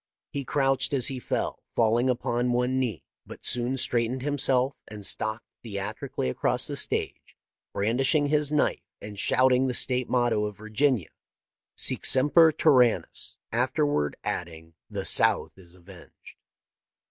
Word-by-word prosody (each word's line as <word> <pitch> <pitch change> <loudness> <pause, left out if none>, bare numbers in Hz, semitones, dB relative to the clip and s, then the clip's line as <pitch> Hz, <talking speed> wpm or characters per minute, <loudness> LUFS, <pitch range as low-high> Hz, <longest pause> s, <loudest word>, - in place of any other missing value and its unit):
He 140 - -3
crouched 135 0 0
as 130 -3 +1
he 130 -2 -4
fell, - - -3
falling 115 +3 +3
iipon 120 -1 0
one 125 +2 +1
knee, 120 -9 -2 0.2
but - - -11
soon 125 +2 0
straightened 120 +1 0
himself 135 -2 +1
and 105 -2 -8
stalked 110 +3 -2 0.2
theatrically 100 - -4
across 65 - 0
the - - -3
stage, - - -3 0.3
brandishing 130 +8 +1
his 150 0 +1
knife 150 -1 +1 0.2
and 105 -1 -8
shouting 130 +3 +3
the 125 - -2
State 125 0 -1
motto 120 -4 +2
of 105 -1 -6
Virginia, 110 - 0 0.4
' - - -66
Sic - - 0
semper 150 +5 +5
tyrannis! 130 -7 +2
' - - -64
afterward 75 0 0
adding, 80 -1 -5
' - - -65
The - - -4
South - - +1
is 90 -2 -16
avenged 90 0 -15
125 Hz, 145 wpm, -27 LUFS, 105-130 Hz, 0.4 s, semper